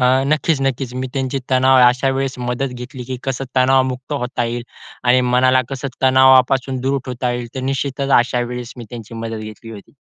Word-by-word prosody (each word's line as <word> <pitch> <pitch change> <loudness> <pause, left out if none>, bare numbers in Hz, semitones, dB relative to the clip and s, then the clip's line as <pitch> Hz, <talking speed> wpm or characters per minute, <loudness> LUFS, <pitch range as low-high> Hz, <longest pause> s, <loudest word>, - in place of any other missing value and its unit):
अ, - - +3 0.2
नक्कीच, 155 0 +1
नक्कीच. 135 -2 -2
मी 130 +1 -3
त्यांची 135 0 -1
तणाव 130 0 +4
अशा 125 +2 0
वेळेस 135 -1 -2
मदत 125 +2 -2
घेतली, 125 +1 -8
की 130 - -2
कसं 135 0 -2
तणावमुक्त 130 +1 +2
होता 125 -3 -2
येईल 120 +1 -3 0.4
आणि 125 +1 +4
मनाला 130 +1 +4
कसं 135 0 -4
तणावापासून 130 0 +4
दूर 135 +2 0
ठेवता 125 -1 -2
येईल. 120 0 -4
तर 130 - -3
निश्चितच 135 0 -2
अशा 120 0 +1
वेळेस 120 0 -5
मी 120 - -8
त्यांची 115 -2 -9
मदत 115 0 -5
घेतली 115 +2 -12
होती. 105 +3 -12
130 Hz, 185 wpm, -19 LUFS, 125-135 Hz, 0.4 s, तणाव